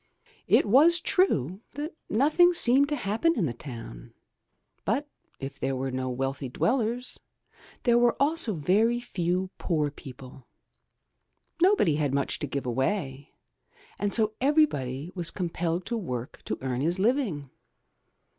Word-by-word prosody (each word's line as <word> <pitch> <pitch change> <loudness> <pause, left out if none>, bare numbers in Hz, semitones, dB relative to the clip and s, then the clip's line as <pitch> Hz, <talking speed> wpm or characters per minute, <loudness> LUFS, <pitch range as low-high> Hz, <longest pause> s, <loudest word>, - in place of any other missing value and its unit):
It - - +4
was 300 +11 +6
true 190 - +1
that 295 +4 -5 0.2
nothing 310 +9 +4
seemed 280 -2 +4
to 295 - 0
happen 255 +9 0
in 185 - +1
the 125 - -2
town, 115 - -10 0.7
but 265 +9 -1 0.3
if 140 0 -7
there 135 - -1
were 130 +1 -3
no 130 0 -3
wealthy 135 +1 -3
dwellers, 240 - -1 0.6
there 240 -1 +4
were 240 -1 +3
also 280 - +1
very 210 +10 +2
few 185 -5 -2
poor 150 -5 0
people. 130 -2 -12 1.1
Nobody 350 - +4
had 145 -3 0
much 140 - -1
to - - -3
give 140 -2 -4
away, 135 - -2 0.6
and 205 0 0
so 215 -1 +2
everybody 175 - +1
was 175 -3 -1
compelled 175 -1 -2
to 235 - -2
work 125 - -5
to - - -3
earn 130 -1 -2
his 170 +5 0
living. 195 - 0
180 Hz, 135 wpm, -27 LUFS, -, 1.1 s, was